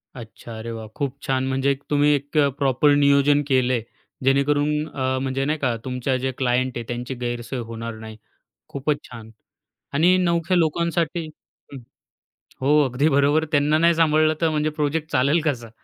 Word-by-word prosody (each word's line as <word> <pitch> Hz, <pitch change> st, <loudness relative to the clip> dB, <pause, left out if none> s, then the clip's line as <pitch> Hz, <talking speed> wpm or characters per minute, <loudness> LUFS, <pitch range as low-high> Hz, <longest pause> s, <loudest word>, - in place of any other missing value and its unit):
अच्छा, 115 Hz, -1 st, -10 dB
अरे 115 Hz, +1 st, -6 dB
वाह! 110 Hz, -1 st, -7 dB
खूप 140 Hz, -2 st, -3 dB
छान! 130 Hz, -3 st, 0 dB
म्हणजे 135 Hz, +1 st, +1 dB
एक 140 Hz, +1 st, -5 dB
तुम्ही 145 Hz, 0 st, +3 dB
एक 145 Hz, +2 st, -3 dB
अ, 145 Hz, -, +5 dB
प्रॉपर 140 Hz, +1 st, +3 dB
नियोजन 140 Hz, +1 st, +4 dB
केलंय, 130 Hz, -3 st, +2 dB, 0.4 s
जेणेकरून 145 Hz, +3 st, +1 dB
अ, 130 Hz, -3 st, -2 dB
म्हणजे 135 Hz, 0 st, -2 dB
नाही 155 Hz, +2 st, -1 dB
का 130 Hz, -4 st, 0 dB
तुमच्या 130 Hz, +1 st, -2 dB
जे 135 Hz, -, 0 dB
क्लायंट 130 Hz, 0 st, 0 dB
आहेत 120 Hz, -, -5 dB
त्यांची 120 Hz, +2 st, -4 dB
गैरसोय 120 Hz, +1 st, -4 dB
होणार 115 Hz, 0 st, -6 dB
नाही. 110 Hz, -1 st, -10 dB, 0.5 s
खूपच 145 Hz, +1 st, -1 dB
छान! 115 Hz, -3 st, -10 dB, 0.6 s
आणि 170 Hz, +6 st, +4 dB
नवख्या 170 Hz, 0 st, +1 dB
लोकांसाठी 170 Hz, 0 st, 0 dB, 0.5 s
हं. -, -, -7 dB, 0.8 s
हो. 145 Hz, +3 st, +4 dB
अगदी 130 Hz, +5 st, 0 dB
बरोबर, 145 Hz, +2 st, +2 dB
त्यांना 150 Hz, 0 st, +3 dB
नाही 170 Hz, +1 st, +3 dB
सांभाळलं 155 Hz, -1 st, +3 dB
तर 165 Hz, -, +3 dB
म्हणजे 155 Hz, 0 st, 0 dB
प्रोजेक्ट 150 Hz, +1 st, -2 dB
चालेल 140 Hz, +6 st, +2 dB
कसा? 120 Hz, -6 st, -2 dB
140 Hz, 165 wpm, -22 LUFS, 130-150 Hz, 0.8 s, अ